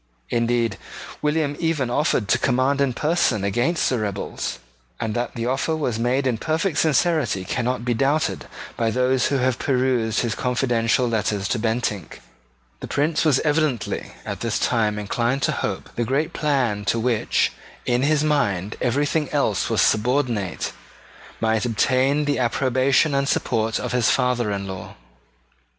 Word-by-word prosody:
Indeed 115 -3 0 0.4
William 150 -1 0
even 155 -7 0
offered 125 -6 +1
to 120 - +3
command 130 +2 +1
in 140 -2 +2
person 150 - +1
against 120 - +1
the 125 - 0
rebels; 100 -2 -3 0.4
and 110 -1 -2
that 120 +1 -3
the 115 -1 -3
offer 135 +6 0
was 125 -8 -2
made 125 +4 +1
in 120 -4 0
perfect 160 +5 0
sincerity 155 - +1
cannot 120 +3 -2
be 120 - +1
doubted 140 +6 0 0.3
by 115 -1 0
those 125 +2 +2
who 140 - +1
have 130 -1 0
perused 125 -4 +1
his 120 -3 -1
confidential 125 -1 +1
letters 105 -3 -1
to 120 - 0
Bentinck. 110 -5 -2 0.6
The - - -7
Prince 150 +3 +1
was 150 -5 +3
evidently 150 -5 -1
at - - -4
this - - -1
time 110 -3 +1
inclined 120 +6 -1
to - - +2
hope - - -3
that - - -20
the 120 - +1
great 145 +8 -1
plan 130 -9 0
to 100 - +1
which 115 -1 +1 0.3
in 125 0 +1
his 150 +1 +2
mind 105 -11 0
everything 145 +4 0
else - - 0
was - - +3
subordinate 115 -4 0 0.7
might 110 -1 +1
obtain 130 +5 +2
the 145 -1 0
approbation 130 +4 +2
and 140 0 +1
support 110 0 0
of - - -4
his 125 -2 +2
father 120 -4 +1
in 100 -1 -3
law. 95 -1 -7
125 Hz, 155 wpm, -22 LUFS, 115-140 Hz, 0.7 s, to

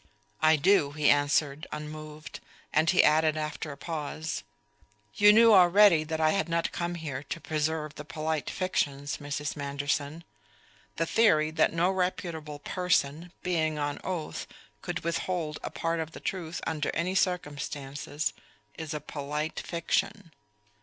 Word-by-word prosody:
"I 155 0 +6
do," 150 -2 +3
he 150 -1 +4
answered 145 +1 +1
unmoved; 155 0 -7 0.3
and 160 +1 +3
he 185 - +5
added 155 0 +4
after 155 0 -4
a 140 - -9
pause: 155 0 -4 0.7
"You 205 0 +7
knew 225 +1 +7
already 185 -2 +7
that 160 +1 -3
I 155 0 +4
had 195 -2 0
not 170 0 0
come 175 0 -3
here 150 -6 -5
to 145 - -6
preserve 155 -1 -2
the 150 - -8
polite 155 0 -3
fictions, 145 -6 -1
Mrs. 145 0 -4
Manderson. 145 +2 -2 0.7
The 165 - 0
theory 155 -6 +3
that 160 - +3
no 170 +3 +2
reputable 170 -5 -2
person, 165 0 0
being 160 -4 0
on 145 -1 -2
oath, 175 -4 -4 0.3
could - - -4
withhold 170 -2 -2
a - - -4
part 165 0 -2
of 160 0 -4
the - - -8
truth 175 -3 -4
under 155 -2 -1
any 170 +3 0
circumstances 145 -5 -2 0.5
is 160 -1 -4
a 150 - -4
polite 150 +1 -4
fiction." 175 +2 -2
155 Hz, 145 wpm, -29 LUFS, 150-170 Hz, 0.7 s, You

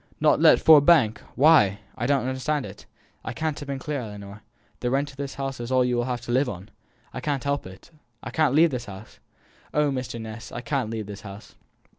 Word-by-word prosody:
"Not - - +3
let - - +6
Ford 155 -3 +7
Bank! 130 -10 +4 0.2
Why? 135 -9 +5 0.2
I 120 - -2
don't 140 -3 +1
understand 130 +2 -2
it - - -12 0.4
I - - -5
can't 155 -2 -3
have 145 - -8
been 140 -1 -3
clear 145 +2 -4
Ellinor, 105 -1 -9 0.4
the 125 - -1
rent 140 +3 0
of 135 - -19
this 140 -1 -5
house 135 -1 -4
is 120 +1 -5
all 130 -1 +3
you 125 0 0
will 120 0 0
have 125 -1 -3
to - - -6
live 130 +2 +2
on!" 95 -2 -8 0.4
"I 130 - -5
can't 140 -2 -2
help 140 -6 -2
it, 95 - -14 0.3
I - - -6
can't 155 -4 +2
leave 165 +1 +5
this 125 -2 -4
house. 100 +2 -12 0.6
Oh, 150 -1 +2
Mr. 130 -3 -4
Ness, 110 0 -8
I 120 - -6
can't 130 -2 -2
leave 110 -2 -4
this 100 +1 -9
house." 100 -1 -11
130 Hz, 225 wpm, -25 LUFS, 110-140 Hz, 0.6 s, Ford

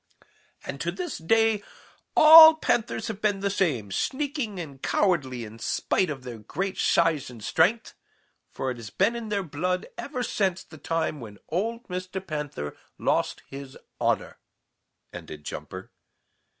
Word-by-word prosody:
"And - - -6
to - - -1
this 360 -2 -5
day 225 +5 +2 0.6
all 320 +1 +11
Panthers 240 -7 -1
have 215 -2 -5
been 205 -2 +1
the 200 0 0
same, 140 - 0
sneaking 270 - -2
and 140 -6 -8
cowardly 135 - 0
in 110 +1 -12
spite 180 +9 0
of 135 -4 -5
their 120 -3 -7
great 190 - -4
size 165 -6 +2
and 115 -4 -11
strength, 180 - +2 0.6
for 130 - -3
it 125 - -6
has 115 -3 -8
been 200 - +1
in 230 -2 -5
their 200 -2 -1
blood 180 +3 -2
ever 255 -4 -4
since 190 -6 -1
the 155 - -14
time 165 -2 -2
when 105 -4 -10
old 225 +8 -2
Mr. 185 0 -5
Panther 145 - -5 0.2
lost - - 0
his 135 -1 -9 0.2
honor," - - -1 0.7
ended 75 -1 -9
Jumper. - - -7
180 Hz, 150 wpm, -26 LUFS, 135-215 Hz, 0.7 s, all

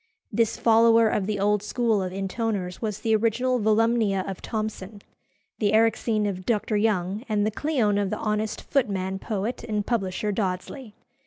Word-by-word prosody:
This 230 -2 +1
follower 230 0 +5
of 200 -3 -1
the 210 -2 -1
old 205 +1 +2
school 220 0 0
of 185 -1 -3
intoners 195 -1 -3
was 215 -2 -3
the 220 -1 +2
original 240 +3 +1
Volumnia 220 -2 +2
of 195 -2 -6
Thomson, 215 -2 -5 0.6
the 210 -1 +1
Erixene 220 -1 +2
of 185 -2 -4
Dr. 215 0 0
Young, 205 -1 0
and 210 -1 +1
the 215 - 0
Cleone 220 -6 +1
of 200 - -1
the - - -2
honest 215 0 -2
footman 195 -8 -1
poet 215 +4 -3
and 210 -3 -2
publisher 210 -2 -1
Dodsley. 205 +4 -4
215 Hz, 160 wpm, -25 LUFS, 200-225 Hz, 0.6 s, follower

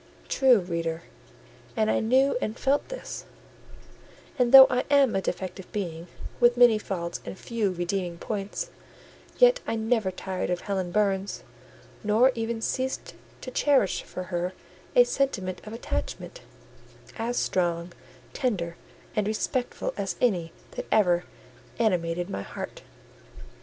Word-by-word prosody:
True, 260 -3 +5
reader; 165 -2 -3 0.7
and 220 0 +3
I - - +2
knew 260 +5 +3
and 215 +3 -3
felt 280 - +1
this: - - -7 1.1
and 245 -1 +3
though 265 0 +12
I 250 -1 0
am 280 -4 +5
a 195 - +1
defective 190 0 -5
being, 170 -4 -4 0.3
with 240 0 +5
many 240 -3 +6
faults 170 -4 -4
and - - -7
few 225 -2 -1
redeeming 175 0 -2
points, 210 - -4 0.7
yet - - +6
I - - 0
never 220 -2 +1
tired 185 0 -4
of 180 -1 -1
Helen 190 -3 -2
Burns; 195 -1 0 0.6
nor 220 +5 +4
ever 225 0 -2
ceased 260 +3 -2 0.3
to 255 - -7
cherish 270 -8 +2
for 185 - -7
her 175 +1 -1 0.4
a 245 - +9
sentiment 245 -8 -1
of 215 - -8
attachment, 375 - -5 0.8
as 235 +2 -1
strong, 175 -1 0 0.4
tender, 180 -11 -2 0.4
and 210 -1 +1
respectful 245 +4 -2
as 195 -3 -2
any 180 -9 +1 0.2
that - - -6
ever 180 -4 +3 0.5
animated 175 -5 0
my 145 - -4
heart. - - -7
210 Hz, 130 wpm, -27 LUFS, 180-245 Hz, 1.1 s, though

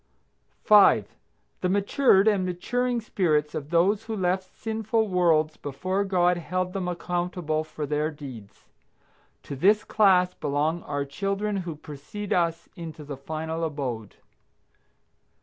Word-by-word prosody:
5. - - +5 0.5
The 180 - +1
matured 200 +1 +3
and 205 -3 +3
maturing 240 +7 -1
spirits 155 -8 0
of 145 -1 -5
those 195 +6 +2
who 225 -1 -4
left 185 -1 -1
sinful 220 0 -1
worlds 160 -4 +2
before 185 +8 -2
God 180 -2 +2
held 180 +1 -2
them 190 -2 -2
accountable 175 -2 -2
for 155 -1 -6
their 150 +1 0
deeds. 120 -9 -11 0.8
To 140 - -6
this 205 +9 +4
class 185 -4 +3
belong 150 +4 -1
our 145 -1 -2
children 195 +7 -2
who 175 -4 -4
precede 155 +8 -6
us 170 -2 0
into 160 -2 -8
the 145 -1 -6
final 160 +4 -4
abode. 130 -9 -4
175 Hz, 130 wpm, -26 LUFS, 150-195 Hz, 0.8 s, 5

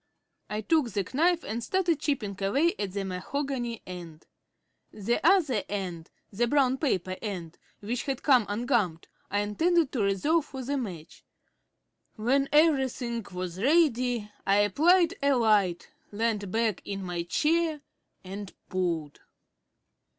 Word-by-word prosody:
I 210 +1 -2
took 295 +2 +2
the 200 -2 -2
knife 340 +4 +2
and 230 +3 -4
started 345 -3 +1
chipping 275 -10 -2
away 275 +13 +2
at 200 -3 -3
the 200 -1 -2
mahogany 240 +5 -3
end. 170 -3 -9 0.7
The 220 +3 -1
other 315 - +4
end 180 -5 -4 0.2
the 235 +4 0
brown 265 -1 +2
paper 185 - -1
end, 180 -7 -6 0.2
which 235 +4 -3
had 270 -3 -3
come 255 -7 +4
ungummed 210 - 0 0.2
I 205 +1 +1
intended 320 +9 +2
to 245 - -1
reserve 240 - +2
for 265 -3 -7
the 280 +3 -2
match. 185 - -6 0.9
When 270 +5 +1
everything 265 -6 +2
was 180 0 -5
ready 250 -6 +2
I 195 - +3
applied 330 - +4
a 280 0 +3
light, 210 - +2 0.2
leant 210 -2 -1
back 220 -1 0
in 195 -1 -5
my 175 -2 -3
chair, 310 - +1 0.4
and 195 +1 -7 0.2
pulled. 170 -5 -2
230 Hz, 135 wpm, -28 LUFS, 195-280 Hz, 0.9 s, other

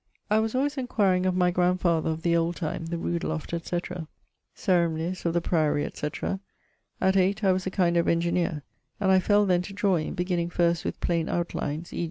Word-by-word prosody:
I 215 - +5
was 220 0 -1
alwayes 280 +2 0
enquiring[T] 195 -7 +1
of 185 - +1
my 180 -1 +3
grandfather 175 -2 +1
of 160 0 -3
the 170 -1 +2
old 170 +1 +1
time, 165 -1 -4
the 170 +1 -3
rood 170 0 -2
loft, 160 +1 -4
etc., 170 0 -3 0.5
ceremonies, 170 0 0
of 165 - 0
the 175 - +2
priory, 155 -4 +1
etc. 150 +5 -4 0.6
At 190 0 +2
8, 195 +3 +2
I 190 - +5
was 185 0 -1
a - - +1
kind 180 -3 +1
of 170 - +2
engineer; 170 -2 0 0.4
and 190 -2 +2
I 190 - +6
fell 205 +2 +3
then 180 -2 +2
to 195 +2 -8
drawing, 195 -6 0
beginning 175 -1 -1
first 170 -1 +1
with - - -3
plaine 170 -2 0
outlines, 170 -1 -3
e. - - -4
175 Hz, 200 wpm, -26 LUFS, 170-190 Hz, 0.6 s, I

